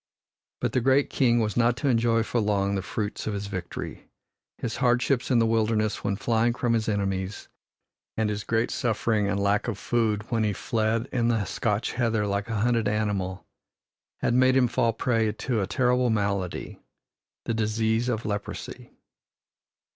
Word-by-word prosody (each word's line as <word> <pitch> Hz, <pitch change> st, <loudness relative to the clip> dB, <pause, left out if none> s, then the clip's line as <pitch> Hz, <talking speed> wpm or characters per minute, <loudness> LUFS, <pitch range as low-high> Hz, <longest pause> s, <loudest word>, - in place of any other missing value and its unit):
But -, -, 0 dB
the 130 Hz, -, +2 dB
great 135 Hz, +3 st, +3 dB
king 120 Hz, -3 st, +3 dB
was 105 Hz, -2 st, -1 dB
not 120 Hz, 0 st, +3 dB
to 140 Hz, -, -1 dB
enjoy 115 Hz, -2 st, +3 dB
for 120 Hz, -, -1 dB
long 100 Hz, -1 st, +1 dB
the 95 Hz, -, -1 dB
fruits 105 Hz, +3 st, -4 dB
of 105 Hz, -, -1 dB
his 100 Hz, 0 st, -4 dB
victory. 95 Hz, -3 st, -6 dB, 0.5 s
His 115 Hz, -2 st, -4 dB
hardships 125 Hz, 0 st, +1 dB
in 125 Hz, -, +3 dB
the 115 Hz, -, +4 dB
wilderness 110 Hz, -1 st, +1 dB
when 100 Hz, -1 st, 0 dB
flying 115 Hz, +2 st, +1 dB
from 120 Hz, -1 st, 0 dB
his 110 Hz, -1 st, 0 dB
enemies, 95 Hz, -1 st, -2 dB, 0.7 s
and 110 Hz, -1 st, +1 dB
his 105 Hz, 0 st, -3 dB
great 115 Hz, +1 st, 0 dB
suffering 110 Hz, -4 st, 0 dB
and 100 Hz, 0 st, 0 dB
lack 100 Hz, +2 st, +1 dB
of 115 Hz, -5 st, -2 dB
food 110 Hz, -1 st, 0 dB
when 115 Hz, -2 st, +1 dB
he 105 Hz, -1 st, +1 dB
fled 115 Hz, +3 st, -1 dB
in 120 Hz, -3 st, +1 dB
the 115 Hz, -4 st, +1 dB
Scotch 105 Hz, +2 st, -1 dB
heather 115 Hz, -4 st, +1 dB
like 100 Hz, +1 st, -2 dB
a 110 Hz, -3 st, -1 dB
hunted 115 Hz, -2 st, +2 dB
animal, 100 Hz, -3 st, -1 dB, 0.8 s
had -, -, +1 dB
made 130 Hz, +1 st, +4 dB
him 125 Hz, -2 st, +4 dB
fall 120 Hz, -1 st, +1 dB
prey 115 Hz, -1 st, +1 dB
to 115 Hz, 0 st, -1 dB
a 95 Hz, -, -1 dB
terrible 125 Hz, +1 st, +2 dB
malady 100 Hz, -4 st, -2 dB, 0.7 s
the -, -, -1 dB
disease 110 Hz, +2 st, 0 dB
of 115 Hz, -2 st, -2 dB
leprosy. 105 Hz, -1 st, -5 dB
110 Hz, 170 wpm, -26 LUFS, 105-120 Hz, 0.8 s, the